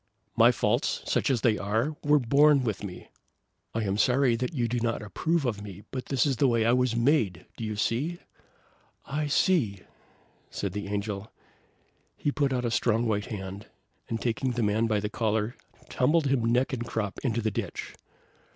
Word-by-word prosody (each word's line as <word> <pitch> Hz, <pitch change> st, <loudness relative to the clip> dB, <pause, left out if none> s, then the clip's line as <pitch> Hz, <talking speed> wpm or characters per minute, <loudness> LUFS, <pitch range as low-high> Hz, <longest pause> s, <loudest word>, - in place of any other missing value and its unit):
"My -, -, +6 dB
faults, -, -, 0 dB
such -, -, +1 dB
as 125 Hz, -5 st, +1 dB
they 110 Hz, -2 st, +2 dB
are, 110 Hz, +9 st, 0 dB
were 150 Hz, 0 st, +5 dB
born 140 Hz, +2 st, +4 dB
with 110 Hz, -4 st, -2 dB
me. 95 Hz, -3 st, -8 dB, 0.7 s
I 115 Hz, -, 0 dB
am 100 Hz, 0 st, -1 dB
sorry 125 Hz, +1 st, +3 dB
that 125 Hz, +6 st, -2 dB
you 125 Hz, -7 st, 0 dB
do 120 Hz, +1 st, -1 dB
not 115 Hz, -2 st, -1 dB
approve 160 Hz, -, -1 dB
of 105 Hz, -5 st, -1 dB
me, 100 Hz, -1 st, -9 dB
but 130 Hz, -1 st, -5 dB
this 135 Hz, -4 st, +2 dB
is 135 Hz, -4 st, 0 dB
the 140 Hz, -, +4 dB
way 115 Hz, -2 st, +2 dB
I 115 Hz, -, +4 dB
was 125 Hz, -1 st, +2 dB
made; 115 Hz, -, +1 dB
do -, -, -7 dB
you 110 Hz, -1 st, -3 dB
see?" 130 Hz, +11 st, -1 dB, 0.9 s
"I 150 Hz, +2 st, -2 dB
see!" 130 Hz, -, +2 dB, 0.7 s
said 100 Hz, -3 st, -4 dB
the 100 Hz, -1 st, -4 dB
Angel. 100 Hz, 0 st, -4 dB, 0.9 s
He 145 Hz, -, 0 dB
put 140 Hz, -1 st, 0 dB
out 125 Hz, -1 st, -1 dB
a 120 Hz, -, 0 dB
strong 115 Hz, 0 st, +1 dB
white 105 Hz, -2 st, 0 dB
hand, 100 Hz, -2 st, -6 dB, 0.4 s
and 115 Hz, -, -2 dB
taking 125 Hz, +2 st, -1 dB
the 120 Hz, -1 st, -1 dB
man 110 Hz, +2 st, +2 dB
by 105 Hz, -2 st, +1 dB
the 105 Hz, -, -1 dB
collar, 110 Hz, +1 st, -1 dB, 0.3 s
tumbled 150 Hz, +5 st, +2 dB
him 125 Hz, -4 st, +2 dB
neck 130 Hz, +4 st, +1 dB
and 120 Hz, -2 st, -2 dB
crop 110 Hz, -3 st, -3 dB
into 120 Hz, -4 st, -1 dB
the 110 Hz, -, +1 dB
ditch. -, -, -5 dB
115 Hz, 190 wpm, -28 LUFS, 105-135 Hz, 0.9 s, My